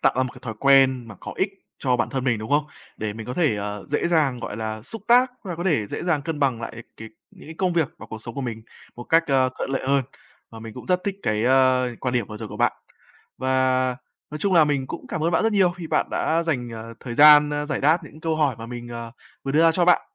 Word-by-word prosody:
tạo - - +3
ra 130 - +3
một 130 - -4
cái - - -13
thói 115 -2 -5
quen 135 -3 +4
mà 110 - -9
có - - -7
ích 190 +1 0 0.3
cho 125 -2 +1
bản - - 0
thân 135 -2 -2
mình, 120 -4 +1
đúng 110 +1 -7
không? 145 +1 +3 0.3
Để 105 -1 -3
mình 110 0 -8
có 125 - -4
thể, 155 -11 +2
ờ, 105 0 -5
dễ 150 +4 0
dàng, 150 -7 +2
gọi 105 - -5
là, 110 -1 -4
xúc 225 - -8
tác 250 +2 +5
và 180 -4 -5
có 175 - -4
thể 145 - +1
dễ - - -5
dàng 160 -5 +1
cân 160 -2 -4
bằng 130 -5 +1
lại 115 - -6 0.2
cái 110 0 -9 0.2
những - - -15
cái 160 - -8
công 185 -2 +1
việc 165 -5 +1
và - - -10
cuộc 110 0 -8
sống 115 - -8
của - - -4
mình 115 -4 -5 0.3
một 120 - -7
cách, 165 +5 +4
a, 130 -2 +3
thuận - - -3
lợi 135 - -1
hơn. 140 0 +3 0.5
Và 115 - -10
mình 110 -1 -9
cũng - - -10
rất 180 -1 +2
thích 200 -1 -2
cái, 110 0 0
a, 130 0 +4 0.2
quan 125 -1 -2
điểm 120 -4 0
vừa 105 - -8
rồi 110 -1 -7
của - - -8
bạn. - - +2 0.7
Và 130 -1 +1 0.3
nói 150 - -5
chung 190 +4 +1
là 165 -3 +7
mình 140 -3 -1
cũng 170 - -7
cảm 160 - -4
ơn 170 - +2
bạn - - +2
rất 225 0 +2
nhiều 190 -3 +4
khi 175 -2 -8
bạn - - +1
đã 165 +1 +1
dành, 125 -8 -2
à, 110 - -7 0.2
thời 120 -3 -6
gian, 150 +1 +8
a, 150 0 -2
giải 150 - -2
đáp 155 +5 +3
những 155 - -13
câu 160 0 -1
hỏi 145 -6 +1
mà 115 - -7
mình, 120 0 -7
ờ, 115 -1 -7 0.3
vừa 135 - -2
đưa 155 - +4
ra 165 0 +5
cho 175 +1 +2
bạn. 180 - +5
135 Hz, 285 wpm, -23 LUFS, 120-160 Hz, 0.7 s, gian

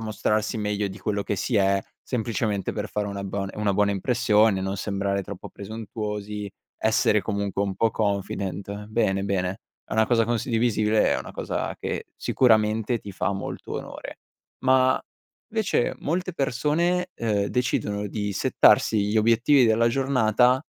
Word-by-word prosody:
mostrarsi 110 0 -1
meglio 105 -1 -1
di 95 +2 -9
quello 100 0 -1
che 100 - -2
si 115 +5 -1
è, 100 -1 +3 0.2
semplicemente 110 -4 -2
per 105 0 -4
fare 105 0 -2
una 100 -1 -4
una 100 - -5
bon 100 0 -3
una 105 -2 0
buona 105 0 +3
impressione, 105 -1 +2
non 95 +1 -3
sembrare 100 0 -1
troppo - - -8
presuntuosi, 105 -1 -5 0.3
essere 110 -1 +3
comunque 100 -1 -2
un 100 -2 -2
po' 115 - +2
confident. 100 -1 -3
Bene, 100 -3 0
bene, 95 0 -1 0.3
è - - -11
una 110 0 +3
cosa 115 -1 +3
condivisibile, 115 -2 +1
è - - 0
una - - -8
cosa - - -3
che - - -4
sicuramente 110 -1 +2
ti 100 -2 -9
fa - - -1
molto 100 - -6
onore. - - -6 0.4
Ma, 130 0 +4 0.5
invece 215 - +1
molte 180 +4 -2
persone, 165 +6 0
uhm, 105 -3 0
decidono 105 -4 -1
di 105 0 -3
settarsi 110 +2 +4
gli 105 +2 +2
obiettivi 120 +4 +4
della 115 +1 +3
giornata 125 0 +2
105 Hz, 150 wpm, -25 LUFS, 100-120 Hz, 0.5 s, Ma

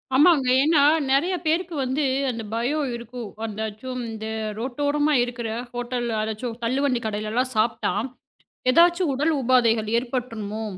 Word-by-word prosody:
ஆமாங்க. 290 -2 +5 0.2
ஏன்னா 305 -1 +4 0.3
நிறைய 330 +8 +2
பேருக்கு 335 +2 0
வந்து 265 +4 -1 0.3
அந்தப் 225 -3 -5
பயம் 270 +5 0
இருக்கும். 235 -1 -7 0.2
அதாச்சும் 220 +4 -5
இந்த 220 -1 -6 0.3
ரோட்டோரமா 290 +4 0
இருக்கிற 240 -2 -4 0.2
ஹோட்டல்ல, 245 -1 -3
அதாச்சும் 220 +2 -4
தள்ளுவண்டி 255 0 +1
கடைல 215 0 -3
எல்லாம் 255 +2 0
சாப்பிட்டா 225 +2 +1 0.8
எதாச்சு 345 +6 +5
உடல் 295 +5 +1
உபாதைகள் 235 -3 +3
ஏற்பட்டுருமோ 230 -4 -3
245 Hz, 120 wpm, -24 LUFS, 225-285 Hz, 0.8 s, ஆமாங்க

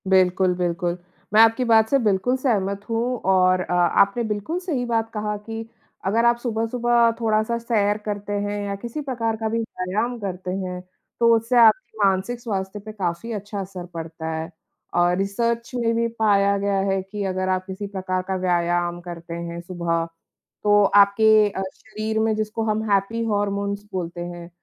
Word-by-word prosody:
बिल्कुल, 185 -1 +4
बिल्कुल। 175 0 -1 0.4
मैं 215 - +8
आपकी 225 +3 +5
बात 220 -1 +4
से 275 - +4
बिल्कुल 210 +5 +2
सहमत 200 -7 0
हूँ 230 0 0 0.2
और 185 -1 +4
अ, 180 - -3
आपने 200 +6 +3
बिल्कुल 215 - -2
सही 310 -10 -2
बात 225 -1 0
कहा 210 -1 -2
कि 225 +2 -7 0.4
अगर 225 +5 +2
आप 235 0 +4
सुबह-सुबह 235 0 +2
थोड़ा-सा 220 0 +1
सैर 215 -3 +1
करते 205 -1 -3
हैं 205 0 -2
या 200 0 -3
किसी 235 +8 -6
प्रकार 235 -5 -2
का 220 0 -2
भी 230 +1 0
व्यायाम 220 +2 -2
करते 185 -3 -4
हैं, 185 -1 -4 0.4
तो 230 -1 +6
उससे 230 +2 +1
आपकी 230 +1 +4
मानसिक 195 +5 0
स्वास्थ्य 200 -3 -4
पे 215 +2 -9
काफ़ी 190 +2 -3
अच्छा 205 0 -5
असर 185 -2 -6
पड़ता 160 -1 -6
है। 160 +1 -4 0.4
और 175 0 +3
रिसर्च 230 +4 -1
में 230 -2 +1
भी 230 0 +1
पाया 200 -2 +3
गया 200 0 0
है 195 0 0
कि 200 +2 -6
अगर 185 0 -1
आप 185 0 0
किसी 190 +1 -6
प्रकार 185 -2 -2
का 190 - -1
व्यायाम 175 -1 0
करते 170 -1 -8
हैं 170 0 -5
सुबह, 170 -2 -2 0.6
तो 205 0 +5
आपके 210 +2 +5
अ, 195 - -4
शरीर 220 +1 -4
में, 220 0 +2
जिसको 215 +1 -2
हम 215 +1 -1
हैपी 200 +4 +1
हॉर्मोन्स 200 -1 -1
बोलते 175 -1 -4
हैं, 175 -1 -8
205 Hz, 175 wpm, -23 LUFS, 185-225 Hz, 0.6 s, मैं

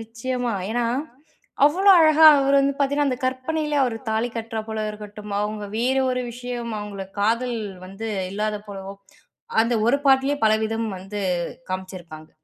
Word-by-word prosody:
நிச்சயமா 235 +2 -3 0.2
ஏன்னா, 240 +1 0 0.8
அவ்ளோ 375 +7 +5
அழகா 315 0 +6
அவரு 275 0 +2
வந்து 275 0 +1
பார்த்தீங்கன்னா, 285 +1 +1
அந்த 255 -2 -2
கற்பனையிலே 295 +3 -1
அவர் 245 -3 0
தாலி 220 +2 0
கட்டுறா 225 -1 -4
போல 220 -1 -3
இருக்கட்டும், 210 0 -9
அவுங்க 210 0 -3
வேற 255 +4 +1
ஒரு 250 0 -1
விஷயம், 245 -1 -5
அவுங்கள 205 -2 -6 0.2
காதல் 235 +3 +1 0.3
வந்து 195 +4 -6 0.2
இல்லாத 210 +1 -2
போலவோ! 195 -1 -7 0.7
அந்த 230 +2 0
ஒரு 265 +4 +4
பாட்டிலேயே 270 +1 +4
பலவிதம் 220 +1 +1
வந்து 195 +3 -7 0.5
காமிச்சிருப்பாங்க. 180 -4 -7
230 Hz, 140 wpm, -23 LUFS, 210-260 Hz, 0.8 s, அழகா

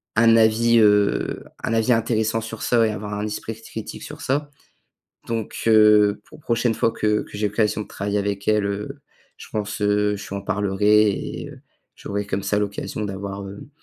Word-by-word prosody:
un 115 +1 +6
avis, 115 +1 +4
heu, 105 -2 +2 0.2
un - - -1
avis 115 +2 +3
intéressant 115 0 0
sur 115 -1 -7
ça 115 -2 +3
et - - -1
avoir 105 0 -5
un 105 +1 -2
esprit 110 +1 -5
critique 110 -1 -8
sur 150 +2 -9
ça. 145 0 -1 0.8
Donc, 115 -2 -3
heu, 105 -2 +5
pour 155 - -15
prochaine 120 -2 +1
fois 115 - +2
que 105 -1 0
que - - -10
j'ai 105 0 +1
l'occasion 105 +1 0
de - - -8
travailler 100 +1 -3
avec 100 0 -3
elle, 105 -1 +3
heu, 100 +1 -4 0.4
je - - -11
pense, 105 0 -3
heu, 105 0 +2
je 100 - -9
lui 100 - -4
en 100 - -4
parlerai 105 +1 +3
et, - - -5
heu, - - -13 0.4
j'aurais, 100 0 -4
comme 100 0 -2
ça, 105 - 0
l'occasion 105 +1 -3
d'avoir, 100 0 -5
heu, 100 +1 -10
105 Hz, 190 wpm, -22 LUFS, 100-115 Hz, 0.8 s, un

